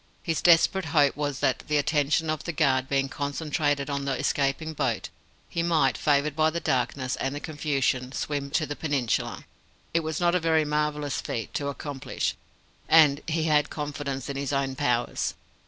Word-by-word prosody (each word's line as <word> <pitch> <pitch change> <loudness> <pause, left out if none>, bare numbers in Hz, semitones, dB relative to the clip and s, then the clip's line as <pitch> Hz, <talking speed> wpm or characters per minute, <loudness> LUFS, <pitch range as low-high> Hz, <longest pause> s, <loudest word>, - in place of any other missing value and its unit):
His 165 -2 -1
desperate 175 +2 +5
hope 145 -2 +3
was 145 -2 -3
that, 130 - +2
the 150 - +2
attention 155 +1 +1
of 155 -1 -3
the 170 - -3
guard 135 -5 +1
being 135 -1 +1
concentrated 145 0 -1
on 140 -1 -2
the 135 -2 -1
escaping 145 +3 0
boat, - - -1 0.4
he 170 - -2
might, 170 -2 +2
favoured 145 0 +1
by 155 0 +3
the 170 +2 -3
darkness 130 -2 -1
and 135 +1 -2
the - - -3
confusion 140 -4 -1
swim 140 0 -3
to 155 +2 +1
the 145 - -5
peninsula. 140 -8 -1 0.5
It 165 - +4
was 160 -1 -3
not 175 -1 +3
a 180 - +3
very 160 -2 +2
marvellous 150 -2 -1
feat 115 - -4
to 140 - -2
accomplish, 140 -1 -3 0.6
and 150 -3 +6
he 160 0 0
had 150 -2 +3
confidence 145 -3 -4
in 140 -1 -4
his 140 0 -2
own 135 -1 -1
powers. 125 -4 0
145 Hz, 175 wpm, -26 LUFS, 140-155 Hz, 0.6 s, and